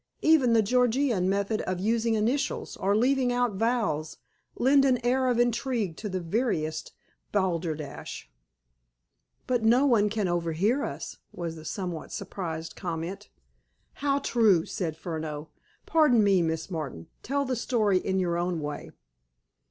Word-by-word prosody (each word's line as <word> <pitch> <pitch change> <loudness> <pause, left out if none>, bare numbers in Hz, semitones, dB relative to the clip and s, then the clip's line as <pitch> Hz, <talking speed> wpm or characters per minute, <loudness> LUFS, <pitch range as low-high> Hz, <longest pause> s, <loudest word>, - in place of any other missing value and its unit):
Even 295 -7 +5
the 225 -1 +5
Georgian 245 -3 +2
method 200 +2 0
of 185 -1 -3
using 225 +3 +1
initials, 250 +7 -1
or 200 +1 +1
leaving 255 +2 +2
out 245 -2 +1
vowels, 210 -8 -1 0.4
lend 270 +2 +4
an 260 -2 +4
air 260 +1 +2
of 245 -2 +2
intrigue 235 -6 0
to 210 - -5
the 185 -1 -2
veriest 165 -5 -2 0.4
balderdash." 165 - -2 1.2
"But 245 -2 +1
no 240 +5 +5
one 220 -6 +4
can 210 -2 -1
overhear 175 - 0
us," - - -5
was 170 -2 -5
the 160 -1 -11
somewhat 180 -2 -5
surprised 165 -4 -5
comment. 175 +3 -5 0.6
"How 280 -1 0
true!" 220 -11 +3
said 160 -4 -3
Furneaux. 160 -2 -5 0.4
"Pardon 300 -9 +4
me, 195 -3 +4
Miss 160 +2 -2
Martin. 140 - -5 0.2
Tell 280 +2 -1
the 255 -1 -1
story 215 -5 +1
in 190 +1 -1
your 175 -2 0
own 175 -1 -1
way." 150 -1 -5
205 Hz, 140 wpm, -27 LUFS, 170-245 Hz, 1.2 s, Even